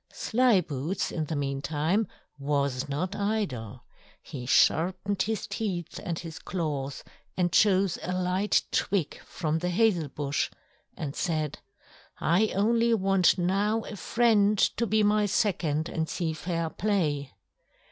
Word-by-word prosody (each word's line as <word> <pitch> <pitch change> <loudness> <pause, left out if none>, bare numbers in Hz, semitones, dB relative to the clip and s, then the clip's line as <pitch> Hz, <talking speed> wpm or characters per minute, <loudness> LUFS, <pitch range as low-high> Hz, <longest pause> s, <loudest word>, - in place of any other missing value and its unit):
Slyboots 190 - +1
in 160 -2 -2
the 155 - -4
meantime 145 +8 0 0.3
was 140 -1 -1
not 180 +8 -2
idle; 200 - -2 0.4
he 125 -4 -7
sharpened 185 +8 +2
his 220 +2 -1
teeth 200 -6 -4
and 170 -2 -3
his 165 -2 -7
claws 145 -6 -3 0.3
and 175 -1 +1
chose 195 -3 +3
a 180 - -4
light 185 +2 +1
twig 190 -7 0
from 160 -2 -3
the 180 +1 -1
hazel 180 -4 +2
bush 145 +1 -1 0.5
and 145 -2 -4
said: 155 -5 -2 0.6
"I 180 +7 +3
only 230 +3 +3
want 195 -3 +3
now 200 +5 +1
a 215 - -7
friend 215 -1 +3
to 235 +4 +2
be 215 +1 +3
my 210 0 +3
second 170 -7 0
and 160 -1 -2
see 165 -3 -2
fair 165 0 -3
play." 155 - -1
180 Hz, 130 wpm, -28 LUFS, 150-205 Hz, 0.6 s, chose